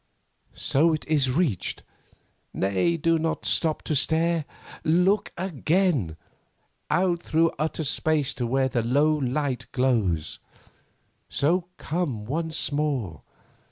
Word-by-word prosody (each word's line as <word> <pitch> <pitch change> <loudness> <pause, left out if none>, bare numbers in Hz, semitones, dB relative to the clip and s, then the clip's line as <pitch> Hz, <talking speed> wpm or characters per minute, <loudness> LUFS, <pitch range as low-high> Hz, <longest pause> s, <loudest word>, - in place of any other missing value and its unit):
So, 160 +4 +2
it 155 - -3
is 145 -4 +2
reached. 130 - 0 0.7
Nay, 100 - +1
do 165 +1 +2
not 160 0 -2
stop 160 -2 +1
to 155 - -1
stare. 160 +2 +3 0.4
Look 180 +6 +2
again! 165 - 0 0.7
out 175 -2 +1
through 165 +1 +2
utter 160 +1 -1
space 150 0 0
to 120 - -3
where 130 +2 +2
the 125 -2 0
low 140 +7 +3
light 140 -2 -1
glows. 110 - 0 0.9
So, 170 +5 +1
come 145 -10 -3
once 160 +2 -2
more. 140 - -2
150 Hz, 115 wpm, -25 LUFS, 130-165 Hz, 0.9 s, stare